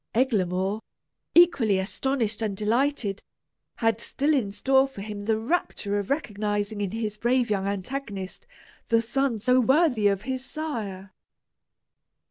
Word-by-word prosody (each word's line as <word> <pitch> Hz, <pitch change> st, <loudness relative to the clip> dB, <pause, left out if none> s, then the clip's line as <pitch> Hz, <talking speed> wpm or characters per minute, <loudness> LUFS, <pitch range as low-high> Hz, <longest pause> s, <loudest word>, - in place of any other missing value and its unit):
Eglamour, 200 Hz, -4 st, +1 dB, 0.5 s
equally 275 Hz, -, +5 dB
astonished 225 Hz, +3 st, -1 dB
and 210 Hz, -3 st, -2 dB
delighted, 220 Hz, -1 st, 0 dB, 0.5 s
had 225 Hz, -1 st, +1 dB
still 290 Hz, +6 st, 0 dB
in 235 Hz, -9 st, +1 dB
store 265 Hz, +5 st, +3 dB
for 270 Hz, -7 st, -10 dB
him 205 Hz, 0 st, -6 dB
the 220 Hz, 0 st, +2 dB
rapture 220 Hz, -, -1 dB
of 200 Hz, -, -5 dB
recognizing 210 Hz, -6 st, -1 dB
in 200 Hz, -, -1 dB
his 215 Hz, 0 st, -3 dB
brave 240 Hz, +1 st, +1 dB
young 195 Hz, -1 st, 0 dB
antagonist 200 Hz, -1 st, -4 dB, 0.4 s
the 230 Hz, -1 st, +4 dB
son 265 Hz, 0 st, 0 dB
so 250 Hz, +4 st, +3 dB
worthy 255 Hz, -4 st, +3 dB
of 200 Hz, 0 st, 0 dB
his 260 Hz, 0 st, -3 dB
sire. 215 Hz, -11 st, -5 dB
220 Hz, 130 wpm, -26 LUFS, 205-265 Hz, 0.5 s, equally